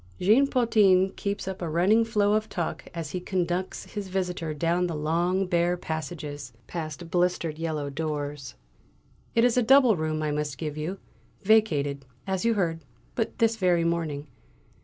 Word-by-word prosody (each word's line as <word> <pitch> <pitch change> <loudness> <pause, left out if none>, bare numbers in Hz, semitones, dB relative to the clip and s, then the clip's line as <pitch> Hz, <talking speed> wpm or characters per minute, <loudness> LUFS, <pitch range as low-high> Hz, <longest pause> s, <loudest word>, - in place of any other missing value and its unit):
Jean 230 +9 +5
Potin 205 -8 +4
keeps 200 -1 -3
up 190 -1 -5
a 170 - -2
running 190 +8 +4
flow 210 -2 +2
of 215 0 0
talk 170 -3 -3
as 165 -3 -5
he 180 - -2
conducts 180 0 -2
his 205 -2 -4
visitor 180 -4 -2
down 170 +4 0
the 170 - -4
long 170 +5 +1
bare 175 -1 +1
passages, 150 -5 -5
past 165 +3 -6
blistered 175 -3 0
yellow 155 -3 -2
doors. 145 -1 -4 0.8
"It 230 +1 +5
is 245 0 +2
a - - +5
double 255 -2 +6
room 155 -1 -2
I 150 - 0
must 150 -2 -2
give 150 -2 -4
you, 160 +6 -4 0.5
vacated, 150 -10 +2 0.2
as 190 -1 -1
you 230 -1 +2
heard, 165 -5 0 0.3
but 225 - -2
this 225 0 +2
very 180 -4 +2
morning. 165 -4 -1
175 Hz, 160 wpm, -27 LUFS, 155-200 Hz, 0.8 s, double